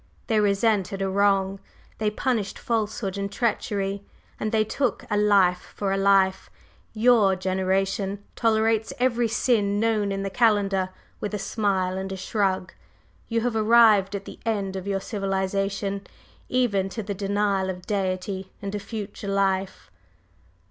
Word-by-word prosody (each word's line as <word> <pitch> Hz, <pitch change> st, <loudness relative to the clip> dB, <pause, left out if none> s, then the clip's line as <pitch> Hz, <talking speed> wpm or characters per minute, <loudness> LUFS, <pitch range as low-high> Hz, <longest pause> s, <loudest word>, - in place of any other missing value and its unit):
They 220 Hz, -3 st, +2 dB
resented 200 Hz, -1 st, +1 dB
a -, -, 0 dB
wrong, 195 Hz, -1 st, +2 dB, 0.4 s
they 215 Hz, -1 st, +1 dB
punished 215 Hz, -2 st, -1 dB
falsehood 215 Hz, -3 st, -2 dB
and 200 Hz, 0 st, -3 dB
treachery, 200 Hz, -3 st, -1 dB, 0.4 s
and 215 Hz, -, -2 dB
they 220 Hz, -1 st, +3 dB
took 265 Hz, +5 st, -1 dB
a -, -, +2 dB
life 200 Hz, -4 st, +3 dB
for 200 Hz, -2 st, -1 dB
a 195 Hz, -, +1 dB
life. 195 Hz, -1 st, +3 dB, 0.4 s
Your 220 Hz, -4 st, +4 dB
generation 190 Hz, +2 st, -1 dB
tolerates 220 Hz, -1 st, +2 dB
every 245 Hz, -2 st, +2 dB
sin 210 Hz, -3 st, +1 dB
known 215 Hz, -2 st, +1 dB
in 195 Hz, 0 st, -2 dB
the 195 Hz, -, -3 dB
calendar 200 Hz, -4 st, +2 dB, 0.3 s
with 210 Hz, 0 st, -3 dB
a -, -, -1 dB
smile 190 Hz, -2 st, -1 dB
and 190 Hz, 0 st, -5 dB
a 190 Hz, -, -4 dB
shrug, 190 Hz, -1 st, -1 dB, 0.5 s
you 230 Hz, 0 st, 0 dB
have 240 Hz, -1 st, -1 dB
arrived 215 Hz, -3 st, +5 dB
at 200 Hz, 0 st, -5 dB
the -, -, -10 dB
end 200 Hz, -4 st, -1 dB
of 190 Hz, 0 st, -5 dB
your 195 Hz, -1 st, -1 dB
civilization, 195 Hz, 0 st, -2 dB, 0.4 s
even 205 Hz, -7 st, +1 dB
to 220 Hz, +3 st, -5 dB
the 200 Hz, 0 st, -3 dB
denial 200 Hz, -1 st, 0 dB
of 180 Hz, -1 st, -6 dB
Deity 190 Hz, -1 st, -2 dB
and 200 Hz, 0 st, -5 dB
a 205 Hz, -, -2 dB
future 205 Hz, -1 st, -7 dB
life." 195 Hz, -1 st, -1 dB
200 Hz, 150 wpm, -25 LUFS, 195-215 Hz, 0.5 s, arrived